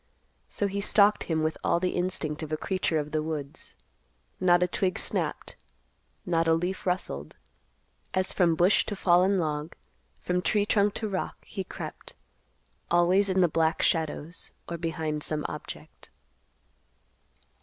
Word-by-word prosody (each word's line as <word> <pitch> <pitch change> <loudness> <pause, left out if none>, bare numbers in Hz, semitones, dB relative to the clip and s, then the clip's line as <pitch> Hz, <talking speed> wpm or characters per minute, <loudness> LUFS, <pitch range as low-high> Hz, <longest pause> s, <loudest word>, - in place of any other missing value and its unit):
So 205 - -1
he 200 0 -1
stalked 205 0 +4
him 160 -2 0
with 155 0 -1
all - - +2
the 180 0 0
instinct 175 -4 -2
of 155 -1 -6
a 155 - 0
creature 185 -2 0
of 150 0 -2
the 155 - 0
woods. 155 0 -6 0.6
Not 180 -1 +4
a - - +2
twig 185 +1 0
snapped, - - -2 0.7
not 165 -2 +1
a 165 - +5
leaf 180 +3 -3
rustled, 75 - -3 0.7
as 185 0 0
from 170 -3 +3
bush 180 +5 +4
to 205 - -2
fallen 185 +1 +4
log, 155 -2 -2 0.4
from 180 0 -1
tree 205 +4 +2
trunk 205 -1 +2
to 220 - -2
rock, 190 -2 -4
he 195 - -5
crept, - - -7 0.7
always 180 +4 +4
in 190 0 +3
the 175 - +6
black 160 0 +1
shadows, 160 +1 -1
or 170 -1 -5
behind 160 -2 -2
some 150 0 -1
object. - - -9
175 Hz, 150 wpm, -28 LUFS, 160-190 Hz, 0.7 s, the